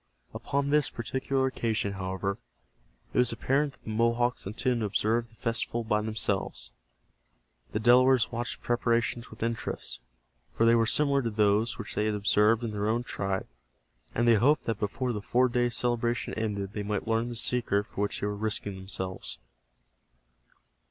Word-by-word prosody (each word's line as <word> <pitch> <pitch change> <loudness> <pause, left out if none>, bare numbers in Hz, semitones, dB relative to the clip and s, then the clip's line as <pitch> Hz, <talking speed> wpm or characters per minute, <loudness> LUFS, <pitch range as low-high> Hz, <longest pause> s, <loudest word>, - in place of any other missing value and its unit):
Upon 140 0 -1
this 150 -1 +3
particular 130 +3 -1
occasion, 110 -5 -1
however, 95 +1 -3 0.7
it - - +2
was 125 -1 +4
apparent 140 +2 0
that - - -26
the 110 - -5
Mohawks 115 +1 +1
intended 120 +4 0
to 110 - 0
observe 115 +4 0
the 115 - -22
festival 115 +1 -1
by 105 -1 +1
themselves. 105 - -2 1.0
The 105 - -1
Delawares 125 +1 +5
watched 120 +1 -3
the - - -21
preparations 120 0 0
with 110 0 -7
interest, 115 - -3 0.6
for 115 - +3
they 115 - +6
were 115 -1 +3
similar 140 +1 +3
to 115 - -1
those 105 +1 +2
which 110 - -6
they 105 - 0
had 105 - 0
observed 105 +3 +3
in 115 - -2
their 105 0 -1
own 120 +2 +1
tribe, 95 -5 -2 0.7
and 120 +1 +2
they 115 -2 +6
hoped 145 +8 +3
that 110 -2 -2
before 120 +4 -1
the 105 - -3
four 125 +5 +3
days' 120 -1 0
celebration 120 0 0
ended 100 -3 -3
they 105 - -3
might 105 0 -2
learn 115 +1 +1
the 120 - -5
secret 115 -4 0
for 100 - -6
which 105 - -1
they - - 0
were 105 0 -1
risking 105 -1 -2
themselves. 95 -1 -4
115 Hz, 170 wpm, -29 LUFS, 105-120 Hz, 1.0 s, they